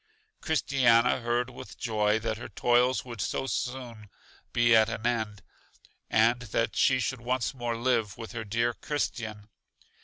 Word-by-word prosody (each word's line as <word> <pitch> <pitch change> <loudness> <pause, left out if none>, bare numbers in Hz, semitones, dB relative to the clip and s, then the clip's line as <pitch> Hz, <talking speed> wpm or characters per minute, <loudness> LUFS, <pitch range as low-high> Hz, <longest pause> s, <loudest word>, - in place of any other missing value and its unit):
Christiana 125 -6 +3
heard 120 +1 0
with 125 - -11
joy 105 -3 +1
that 110 0 -3
her - - -7
toils 125 +2 +2
would 120 -5 -6
so 135 - -2
soon 125 -5 -4 0.4
he 120 -1 +4
at 110 0 +5
an 115 0 -5
end, 110 -5 -1 0.7
and 115 +2 +3
that 115 0 -1
she 130 -2 +3
should 125 0 -2
once 125 +1 -1
more 120 -3 -3
live 115 -4 0
with 115 -1 -8
her 115 -2 -5
dear 115 +3 0
Christian. 110 -7 -4
120 Hz, 150 wpm, -28 LUFS, 110-125 Hz, 0.7 s, at